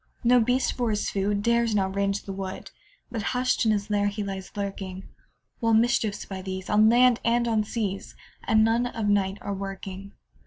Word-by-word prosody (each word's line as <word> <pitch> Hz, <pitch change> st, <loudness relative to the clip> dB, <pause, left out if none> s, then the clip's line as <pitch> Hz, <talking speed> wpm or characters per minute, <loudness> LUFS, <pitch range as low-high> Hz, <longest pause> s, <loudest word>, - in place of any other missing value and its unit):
No 245 Hz, +1 st, +5 dB
beast, 250 Hz, +3 st, +1 dB
for 245 Hz, -2 st, -1 dB
his 210 Hz, -1 st, -1 dB
food, 200 Hz, +1 st, -1 dB
Dares 235 Hz, -1 st, +2 dB
now 195 Hz, -2 st, +2 dB
range 200 Hz, +1 st, -1 dB
the 195 Hz, -, -6 dB
wood, 190 Hz, -1 st, -6 dB, 0.4 s
But 225 Hz, -, -3 dB, 0.2 s
hush'd 250 Hz, -2 st, +1 dB
in -, -, +4 dB
his 205 Hz, 0 st, -1 dB
lair 205 Hz, 0 st, +2 dB
he 205 Hz, +1 st, -3 dB
lies 195 Hz, -2 st, -6 dB
lurking; 195 Hz, -2 st, -5 dB, 0.6 s
While 230 Hz, -2 st, +3 dB
mischiefs, 225 Hz, -2 st, +1 dB
by 190 Hz, -1 st, -6 dB
these, 190 Hz, 0 st, -5 dB
On 215 Hz, +1 st, +5 dB
land 245 Hz, 0 st, +5 dB
and 235 Hz, +1 st, +2 dB
on 220 Hz, -2 st, +2 dB
seas, 205 Hz, -3 st, -4 dB, 0.3 s
At 220 Hz, -, +2 dB
noon 225 Hz, +3 st, +3 dB
of 225 Hz, -3 st, -3 dB
night 200 Hz, -1 st, +1 dB
are -, -, -4 dB
a -, -, -3 dB
working. 195 Hz, 0 st, -7 dB
205 Hz, 195 wpm, -26 LUFS, 195-230 Hz, 0.6 s, No